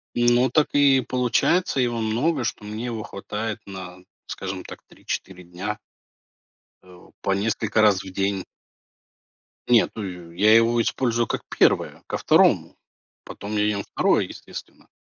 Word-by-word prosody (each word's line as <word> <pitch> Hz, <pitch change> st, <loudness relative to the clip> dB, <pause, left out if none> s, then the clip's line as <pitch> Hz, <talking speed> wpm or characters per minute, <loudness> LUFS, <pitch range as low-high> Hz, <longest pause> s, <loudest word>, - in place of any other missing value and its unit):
Ну, 120 Hz, +1 st, +3 dB
так 155 Hz, 0 st, +3 dB
и 140 Hz, -2 st, +5 dB
получается. 130 Hz, +7 st, +1 dB
Его 120 Hz, -2 st, +1 dB
много, 120 Hz, +6 st, 0 dB
что 110 Hz, -, -3 dB
мне 110 Hz, +3 st, -5 dB
его 115 Hz, -3 st, -4 dB
хватает 105 Hz, +2 st, -5 dB
на, 95 Hz, -2 st, -8 dB, 0.3 s
скажем -, -, -5 dB
так, -, -, -11 dB
3-4 90 Hz, -1 st, -6 dB
дня. 95 Hz, +5 st, -5 dB, 1.1 s
Э, 90 Hz, -1 st, -15 dB, 0.2 s
по 100 Hz, -, -1 dB
несколько 110 Hz, +2 st, 0 dB
раз 100 Hz, -3 st, +4 dB
в 95 Hz, -, -9 dB
день. 95 Hz, 0 st, -1 dB, 1.2 s
Нет, 120 Hz, -2 st, +4 dB
ну 90 Hz, -5 st, -7 dB
я 105 Hz, +5 st, +4 dB
его 115 Hz, +1 st, +4 dB
использую 120 Hz, -1 st, 0 dB
как -, -, -2 dB, 0.2 s
первое, -, -, +2 dB
ко -, -, -2 dB
второму. -, -, +3 dB, 0.5 s
Потом 105 Hz, +1 st, -8 dB
я 105 Hz, -, +2 dB
ем 100 Hz, -2 st, 0 dB
второе, -, -, +1 dB
естественно. -, -, -11 dB
110 Hz, 140 wpm, -24 LUFS, 100-120 Hz, 1.2 s, и